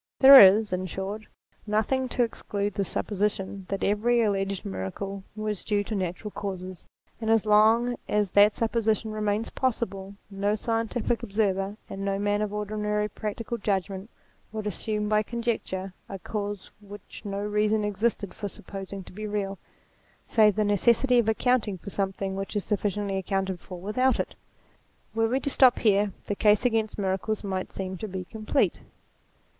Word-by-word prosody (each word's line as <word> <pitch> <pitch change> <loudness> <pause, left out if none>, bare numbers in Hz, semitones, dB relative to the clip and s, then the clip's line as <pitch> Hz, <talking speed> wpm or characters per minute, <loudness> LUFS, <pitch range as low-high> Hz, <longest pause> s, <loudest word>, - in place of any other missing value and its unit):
There 270 0 +11
is, 200 +1 +7
in 185 0 -2
short, 195 +4 -5 0.4
nothing 250 +5 0
to 245 - +1
exclude 205 -3 -3
the 200 - 0
supposition 195 -1 -2
that 195 0 -2
every 230 +4 +2
alleged 195 -2 -1
miracle 145 - -5
was 215 -2 -3
due 205 -1 0
to 220 - -5
natural 190 +2 -3
causes: 185 -3 -6 0.3
and 220 - -2
as 225 -1 +3
long 220 +3 +4
as 210 -3 +1
that 205 +1 +6
supposition 225 -1 0
remains 215 +1 -1
possible, 200 -6 -2 0.2
no 200 +2 0
scientific 225 +1 -1
observer, 200 -1 -1
and 195 0 -6
no 195 0 0
man 205 +1 0
of 210 -1 -1
ordinary 210 0 -1
practical 230 +3 -4
judgment, 195 0 -2 0.4
would 215 -1 -5
assume 210 +1 -2
by 215 0 +3
conjecture 215 -5 -3 0.2
a 195 - -5
cause 205 +1 -5
which 205 -1 -11
no 200 -2 -4
reason 210 +1 +1
existed 210 0 -1
for 205 - -5
supposing 195 +1 -7
to - - -14
be 215 +2 -5
real, 200 -2 -3 0.6
save 210 -3 +4
the 215 - +1
necessity 235 +5 +3
of 225 -2 +2
accounting 220 -3 +1
for 200 +3 -9
something 195 0 -2
which 195 +2 -5
is 205 - -1
sufficiently 205 -1 -1
accounted 190 -1 -2
for 180 +1 -9
without 250 +8 +1
it. - - -2 0.8
Were 225 0 +2
we 255 +4 +1
to - - -1
stop 255 -2 +6
here, 205 -2 +3
the - - -2
case 210 +3 +3
against 225 -3 +1
miracles 200 +2 -1
might 190 -2 -3
seem 190 -1 -5
to 215 - -5
be 185 -2 -5
complete. 215 +2 0
210 Hz, 160 wpm, -27 LUFS, 195-220 Hz, 0.8 s, There